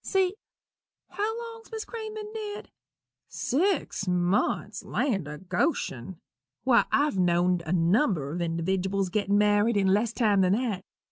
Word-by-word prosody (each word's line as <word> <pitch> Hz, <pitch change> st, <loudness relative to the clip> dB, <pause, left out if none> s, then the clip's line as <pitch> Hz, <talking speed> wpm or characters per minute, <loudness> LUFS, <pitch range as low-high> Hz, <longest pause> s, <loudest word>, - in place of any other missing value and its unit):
See 380 Hz, -2 st, +1 dB, 0.8 s
how 440 Hz, +3 st, -2 dB
long's 455 Hz, +1 st, -15 dB
Miss 440 Hz, -1 st, -5 dB
Crane 440 Hz, -2 st, -6 dB
ben 425 Hz, 0 st, -7 dB
dead? 420 Hz, -2 st, -6 dB, 0.6 s
Six 300 Hz, -, -1 dB
months! 180 Hz, +2 st, 0 dB
land 195 Hz, -, -1 dB
o' 150 Hz, 0 st, -6 dB
Goshen! 185 Hz, -, -2 dB, 0.5 s
why, 250 Hz, -2 st, +4 dB
I've 290 Hz, -9 st, +2 dB
know'd 175 Hz, 0 st, +2 dB
a -, -, -2 dB
number 175 Hz, -, +2 dB
of 170 Hz, -, -4 dB
individdiwals 185 Hz, +3 st, -1 dB
get 205 Hz, 0 st, -1 dB
married 205 Hz, +2 st, +3 dB
in 200 Hz, -, +2 dB
less 215 Hz, +3 st, +1 dB
time 215 Hz, -5 st, +2 dB
than 185 Hz, 0 st, +3 dB
that. 215 Hz, -5 st, -1 dB
205 Hz, 140 wpm, -27 LUFS, 180-300 Hz, 0.8 s, why